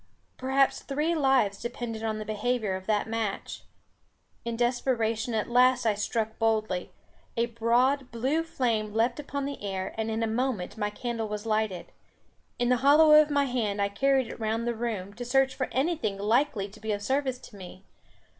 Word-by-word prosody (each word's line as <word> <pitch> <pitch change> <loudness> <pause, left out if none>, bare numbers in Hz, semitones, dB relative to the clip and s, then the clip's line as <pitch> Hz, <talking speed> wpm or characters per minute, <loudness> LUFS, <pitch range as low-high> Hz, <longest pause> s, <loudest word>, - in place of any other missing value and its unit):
Perhaps 265 +1 +1
three 300 +4 -1
lives 265 -10 +2
depended 235 -1 -5
on 220 -1 -1
the 215 - -5
behaviour 215 0 -1
of 190 0 -8
that 210 -1 +1
match. 225 -3 -3 0.8
In 235 -1 -3
desperation 240 -2 0
at 215 - 0
last 250 0 +4
I 220 - +4
struck 220 +2 -2
boldly! 215 -5 0 0.5
a 235 - +3
broad 245 +4 +1
blue 265 +7 0
flame 225 -9 -1
leaped 235 +4 +1
upon 280 -1 -4
the 280 0 -5
air, 190 -2 -3
and 220 0 -1
in 220 +1 -1
a - - +1
moment 225 -5 -2
my 210 -2 -1
candle 230 +1 -4
was 210 +1 -5
lighted. 215 -5 -1 0.7
In 245 0 +1
the 250 - +4
hollow 295 +4 +6
of 305 0 +7
my 285 -1 +2
hand 225 -6 -1
I 200 0 +1
carried 270 +5 +2
it - - -9
round 225 +1 -1
the 240 - 0
room, 220 -4 -4
to 240 +4 -7
search 265 +2 +2
for 260 - -3
anything 265 - 0
likely 215 +1 +1
to 210 +2 -15
be 220 0 -3
of 205 0 -4
service 265 +2 0
to 245 -3 -14
me. 185 0 -11
230 Hz, 185 wpm, -28 LUFS, 215-260 Hz, 0.8 s, of